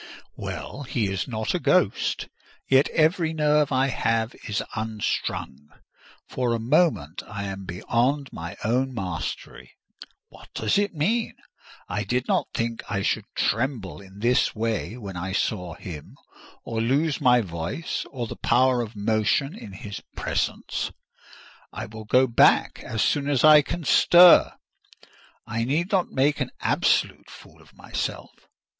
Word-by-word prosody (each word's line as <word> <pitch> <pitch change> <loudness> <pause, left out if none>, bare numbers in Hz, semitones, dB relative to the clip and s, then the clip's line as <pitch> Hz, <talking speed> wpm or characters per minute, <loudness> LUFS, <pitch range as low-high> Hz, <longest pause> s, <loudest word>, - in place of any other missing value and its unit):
Well, 140 - -6
he 115 -7 -2
is 95 - -2
not 110 -3 -2
a - - 0
ghost; - - +1 0.4
yet 135 +2 +4
every 160 +1 +2
nerve 150 -2 +2
I 130 0 +3
have 115 -2 0
is 105 - -1
unstrung: 105 -9 -3 0.6
for 125 -2 -1
a - - -3
moment 120 - +1
I 105 -1 -5
am 95 -1 -6
beyond 125 +10 -1
my 85 +2 -7
own 125 +4 0
mastery. 80 - -5 0.6
What - - -16
does 110 - +1
it 205 -3 -1
mean? 220 +10 0 0.5
I 100 +3 -2
did 125 +2 -1
not - - +1
think 115 0 -2
I 100 -2 -1
should 105 0 0
tremble 110 -2 -1
in 100 +1 -14
this 120 +2 +2
way 115 +1 -2
when 100 -6 -8
I 90 +2 -4
saw 90 -4 -2
him, 75 -5 -9 0.5
or 115 -1 -3
lose 140 +6 +1
my 125 -2 +5
voice 85 - -4
or 125 -4 -4
the - - -7
power 125 +1 +2
of 115 -1 -6
motion 110 - +1
in 105 - -10
his 100 +1 -8
presence. - - -2 0.8
I - - -6
will 110 +1 -10
go 130 +5 +4
back 120 -2 +3
as 110 - -2
soon 145 -1 +1
as 140 -4 +1
I 155 -1 +9
can 170 +4 -5
stir: 175 +6 +7 0.9
I 115 0 -2
need 155 - -1
not 190 -3 +1
make 145 +3 +1
an - - -1
absolute - - +1
fool - - -15
of - - -21
myself. - - -5
115 Hz, 150 wpm, -25 LUFS, 105-140 Hz, 0.9 s, I